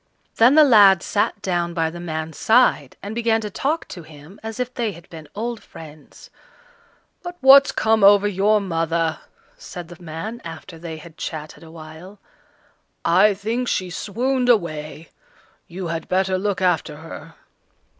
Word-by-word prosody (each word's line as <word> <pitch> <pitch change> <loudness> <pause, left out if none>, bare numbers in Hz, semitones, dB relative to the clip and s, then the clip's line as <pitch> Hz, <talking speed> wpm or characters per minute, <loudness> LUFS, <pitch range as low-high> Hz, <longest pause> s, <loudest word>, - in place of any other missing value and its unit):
Then 245 +5 +5
the 310 - +8
lad 205 -9 +6
sat 205 0 -1
down 175 -2 -2
by 165 -1 0
the 175 - -9
man's 160 -2 -5
side, 220 - +2
and 200 +2 -6
began 230 -1 +1
to 210 -1 -6
talk 300 - -2
to 175 - -8
him 155 +4 -15
as 220 +1 -7
if 250 0 -3
they 230 -4 -2
had 170 0 -15
been 160 -2 -10
old 230 +2 -4
friends. 155 -2 -14 0.9
"But 355 -1 -8
what's 275 +1 +7
come 220 -1 +1
over 205 +1 +6
your 205 +2 +2
mother?" 165 -3 -1 0.4
said 175 - -9
the 175 +1 -13
man, 175 +8 -7
after 165 +1 -10
they 165 -1 -7
had 160 +1 -14
chatted 155 -1 -7
a 165 - -13
while. 160 +4 -12 0.9
"I 195 +5 +4
think 225 +5 -3
she 185 -5 -2
swooned 250 +7 -1
away; 160 -7 -1 0.6
you 180 +2 -7
had 165 -1 -5
better 190 0 +1
look 195 -1 -2
after 175 -4 0
her." 160 0 -11
185 Hz, 160 wpm, -21 LUFS, 165-220 Hz, 0.9 s, the